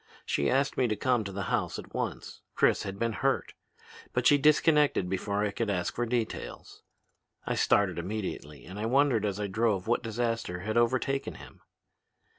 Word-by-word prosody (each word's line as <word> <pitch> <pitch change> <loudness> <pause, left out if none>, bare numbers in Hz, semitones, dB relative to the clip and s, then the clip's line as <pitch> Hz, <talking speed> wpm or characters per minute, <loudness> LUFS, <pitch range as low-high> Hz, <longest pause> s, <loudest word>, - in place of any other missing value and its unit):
She 70 - +1
asked 135 +1 +1
me 125 - +3
to 110 - 0
come 125 -1 +1
to 100 - -5
the 100 +1 -4
house - - 0
at - - -10
once. - - -4
Chris - - +3
had 95 -1 -5
been 115 +1 -1
hurt. - - 0 0.6
But 125 -1 0
she 145 +2 +6
disconnected 150 - +4
before 100 +2 -1
I 105 - 0
could 115 +1 -2
ask 90 -3 -1
for 120 0 -2
details. 115 -2 -4 0.6
I - - -1
started 95 -4 +2
immediately 90 -6 -5
and 95 +3 -8
I 110 - -1
wondered 130 -4 +3
as 100 0 -3
I 105 - -1
drove 100 -1 0
what 120 +2 +1
disaster 115 -5 -2
had 110 +3 -3
overtaken 130 +3 +1
him. - - -13
110 Hz, 180 wpm, -29 LUFS, 100-125 Hz, 0.6 s, she